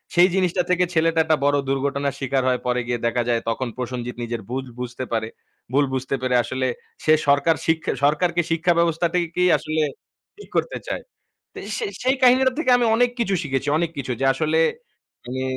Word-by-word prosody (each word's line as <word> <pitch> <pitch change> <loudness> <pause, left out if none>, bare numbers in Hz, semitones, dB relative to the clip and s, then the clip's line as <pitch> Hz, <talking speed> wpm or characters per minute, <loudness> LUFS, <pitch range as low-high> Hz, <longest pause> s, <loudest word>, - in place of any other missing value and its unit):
সেই 175 +1 +7
জিনিসটা 185 -1 +1
থেকে 180 0 +3
ছেলেটা 165 0 +2
একটা 155 -1 +3
বড় 145 0 +3
দুর্ঘটনার 140 0 -1
শিকার 135 -1 0
হয়। 125 -1 +1
পরে 125 0 +1
গিয়ে 120 -1 -1
দেখা 120 +1 +1
যায় 115 -1 +1
তখন 125 +2 -2
প্রসঞ্জিত 125 -1 -4
নিজের 115 -1 -4
ভুল 130 +1 -3
বুঝতে 125 +1 -5
পারে। 110 -1 0 0.5
ভুল 145 +1 +4
বুঝতে 130 +1 -1
পেরে 130 -1 +1
আসলে 130 0 -2 0.4
সে 155 - +5
সরকার 140 +3 +4
সিক 160 0 +2 0.2
সরকারকে 170 +4 +2
শিক্ষা 170 +2 +2
ব্যবস্থাটাকেই 170 +1 +1
আসলে 155 0 -2 0.6
ঠিক 415 - -13
করতে - - 0
চায়। - - -3 0.7
সে - - -3 0.2
সেই 260 +2 +3
কাহিনীর 255 +1 +6
থেকে 290 -6 +2
আমি 240 - +1
অনেক 245 +1 +3
কিছু 215 -4 0
শিখেছি, 135 -2 -2
অনেক 170 0 0
কিছু 130 -2 -3
যে - - +2
আসলে 155 +3 0 0.7
মানি 130 +2 -4
145 Hz, 175 wpm, -22 LUFS, 130-175 Hz, 0.7 s, সেই